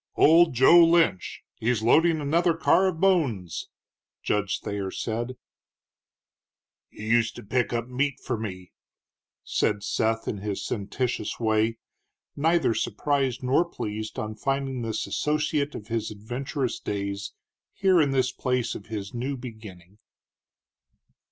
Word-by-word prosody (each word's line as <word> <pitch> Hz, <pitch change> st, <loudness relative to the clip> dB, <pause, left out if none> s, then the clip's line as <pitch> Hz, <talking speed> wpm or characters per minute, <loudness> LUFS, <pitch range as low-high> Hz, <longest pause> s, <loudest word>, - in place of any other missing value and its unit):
"Old 165 Hz, -2 st, +5 dB
Joe 170 Hz, +8 st, +7 dB
Lynch; 165 Hz, -, +2 dB
he's 115 Hz, -1 st, 0 dB
loadin' 160 Hz, +7 st, +4 dB
another 165 Hz, +4 st, +2 dB
car 185 Hz, +3 st, +3 dB
of 170 Hz, -4 st, -2 dB
bones," 140 Hz, -, +1 dB, 0.6 s
Judge 105 Hz, -2 st, 0 dB
Thayer 100 Hz, -2 st, -3 dB
said. 120 Hz, +5 st, -4 dB, 1.5 s
"He 110 Hz, -, -10 dB
used 115 Hz, -1 st, +2 dB
to -, -, -9 dB
pick 120 Hz, +4 st, 0 dB
up 120 Hz, -1 st, -2 dB
meat 135 Hz, +2 st, -1 dB
for 125 Hz, -, -3 dB
me," 95 Hz, -5 st, -6 dB, 0.7 s
said 100 Hz, -, 0 dB
Seth 115 Hz, +2 st, 0 dB
in 105 Hz, -, -2 dB
his 100 Hz, -1 st, -4 dB
sententious 110 Hz, +2 st, -3 dB
way, 110 Hz, 0 st, +1 dB, 0.6 s
neither 160 Hz, -3 st, +2 dB
surprised 135 Hz, -1 st, -1 dB
nor 130 Hz, +6 st, +3 dB
pleased 110 Hz, -10 st, -6 dB
on 110 Hz, 0 st, -3 dB
finding 135 Hz, +3 st, -2 dB
this 110 Hz, -2 st, -2 dB
associate 150 Hz, -1 st, -1 dB
of 105 Hz, -, -8 dB
his 115 Hz, -1 st, -1 dB
adventurous 120 Hz, +5 st, -4 dB
days 100 Hz, 0 st, -4 dB, 0.4 s
here 190 Hz, -4 st, +3 dB
in 145 Hz, -, +2 dB
this 130 Hz, -2 st, +1 dB
place 125 Hz, -2 st, -1 dB
of 100 Hz, -, -9 dB
his 105 Hz, -3 st, -5 dB
new 130 Hz, +3 st, -3 dB
beginning. 105 Hz, -6 st, -11 dB
120 Hz, 130 wpm, -26 LUFS, 110-145 Hz, 1.5 s, Joe